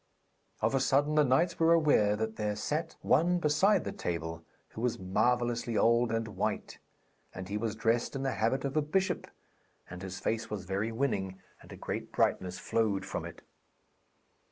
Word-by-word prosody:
Of 110 +3 +1
a 135 - +3
sudden 145 +3 +2
the 150 0 +5
knights 160 +6 +2
were 165 0 +5
aware 145 -11 +4
that 110 +1 -3
there 105 -1 -1
sat 155 +9 -2
one 175 +2 +3
beside 175 +5 +3
the - - -4
table 80 -1 -4 0.3
who 110 - -8
was 120 -1 0
marvellously 120 +4 0
old 115 0 +3
and 115 0 -1
white; - - -3 0.6
and 90 0 -6
he 100 - -4
was 110 0 -2
dressed 115 +3 0
in 135 - -3
the 135 - 0
habit 115 +6 0
of 135 +1 -3
a 155 - +3
bishop, 180 +5 0 0.6
and 90 +1 -9
his 95 -1 -6
face 115 +3 -2
was 100 -4 -5
very 100 +4 -2
winning, 100 -7 -1 0.2
and - - -15
a - - -7
great - - -5
brightness 90 -1 0
flowed 110 -4 0
from - - -4
it. - - -10
115 Hz, 180 wpm, -31 LUFS, 105-145 Hz, 0.6 s, the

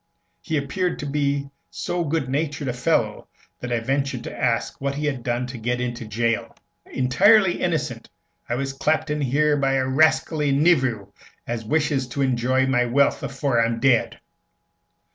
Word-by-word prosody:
He 160 - -2
appeared 175 +6 -1
to - - -6
be 140 -1 -1 0.2
so 170 +1 -3
good 160 -3 -1
natured 145 0 -2
a - - -1
fellow 120 -5 0 0.3
that 125 - -6
I 120 -1 0
ventured 135 0 -1
to - - -7
ask 120 +1 -1
what 140 0 -1
he 150 +1 -3
had 140 -4 -2
done 120 +1 -1
to 125 -1 -8
get 120 +2 -1
into 120 -1 -4
jail. 115 +2 -1 0.3
"Intirely 190 - +4
innocent. 145 -9 -2 0.4
I 120 - 0
was 135 +1 -3
clapped 155 +3 0
in 150 0 -1
here 145 +3 +2
by 135 -1 +1
a 135 -1 +1
rascally 150 +1 +2
nevew 130 - +2 0.3
as 120 -1 -4
wishes 145 -1 0
to 140 +3 -2
enjoy 130 +1 +1
my 125 -2 +2
wealth 140 +4 +2
afore 135 -3 0
I'm 115 0 -1
dead.' 130 -3 +2
135 Hz, 165 wpm, -23 LUFS, 120-150 Hz, 0.4 s, Intirely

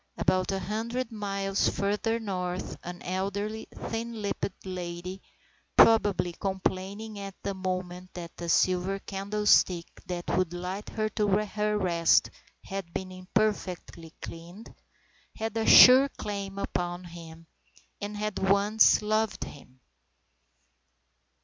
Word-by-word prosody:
About 185 0 +1
a 195 - 0
hundred 225 +6 -3
miles 195 -2 0
further 210 +3 0
north 185 -4 -3
an 175 0 -8
elderly, 200 +4 -3
thin 230 0 -5
lipped 200 -2 -4
lady 180 0 -5 0.6
(probably 205 -5 +5
complaining 195 +3 -3
at 195 -1 -7
the 200 - -2
moment 185 -1 -4
that 170 -1 -8
the 170 -1 -5
silver 185 +3 +2
candle 200 +2 -4
stick 175 -4 +5 0.2
that 175 -1 -4
would 185 -2 0
light 180 +3 -5
her 215 -1 -1
to 210 -1 0
her 210 +1 +1
rest 170 -4 +3 0.3
had 195 -3 -6
been 185 +2 -5
imperfectly 185 -3 -2
cleaned) 175 +6 -9 0.6
had 225 0 -4
a 225 -1 0
sure 260 +2 +9
claim 200 -4 -5
upon 175 -2 -3
him, 165 -1 -11 0.6
and 205 +1 -4
had 210 -1 -2
once 200 +3 +4
loved 215 0 0
him. 130 -2 -12
195 Hz, 120 wpm, -28 LUFS, 180-210 Hz, 0.6 s, sure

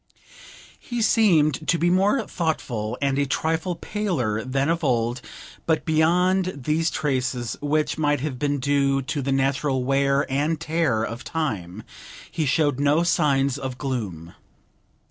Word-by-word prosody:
He 240 -1 -5
seemed 160 - +3
to 170 - +3
be 175 +1 +2
more 205 +6 +2
thoughtful 125 - -3
and 140 0 +1
a 140 - +1
trifle 160 +5 -1
paler 155 - -2
than 135 +2 -1
of 165 0 0
old, 120 -2 0 0.5
but 160 -1 +1
beyond 180 +2 +2
these 160 +4 +1
traces, 130 -5 -2
which 150 +1 0
might 145 -2 +2
have 135 -4 -4
been 145 0 0
due 140 0 +1
to 145 +2 -3
the 135 +1 -2
natural 135 0 0
wear 140 +2 +2
and 145 +4 0
tear 155 -9 0
of 115 +1 -5
time, 110 - -4 0.5
he 155 -3 -1
showed 145 -1 +1
no 145 +4 +3
signs 140 -5 +1
of 130 -2 -5
gloom. 100 - -4
145 Hz, 145 wpm, -24 LUFS, 130-160 Hz, 0.5 s, seemed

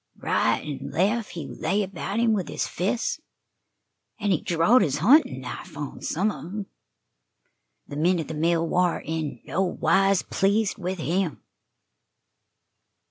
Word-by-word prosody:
Right - - +1 0.2
an' 140 - -6
lef' 205 - +1
he 170 -3 -6
lay 205 +2 -1
about 195 +2 -4
him 230 -1 +3
with 195 -4 -1
his - - -2
fists, 205 - -1 1.0
an' 205 -2 0
he 170 - +2
drawed 175 +9 +4
his 145 -7 +1
huntin' 200 - +4
knife 125 +2 -8
on 145 -2 -6
some 200 +6 0
of - - -7
'em. 200 +4 -5 1.2
The 145 - -7
men 175 +4 +3
at 160 - -4
the - - -5
mill 165 +2 +1
war 180 0 +2
in 155 -6 -3
no 185 - -1
wise 195 +1 +2
pleased 200 +1 +1
with 185 +1 -3
him." 170 0 -1
180 Hz, 145 wpm, -25 LUFS, 160-200 Hz, 1.2 s, drawed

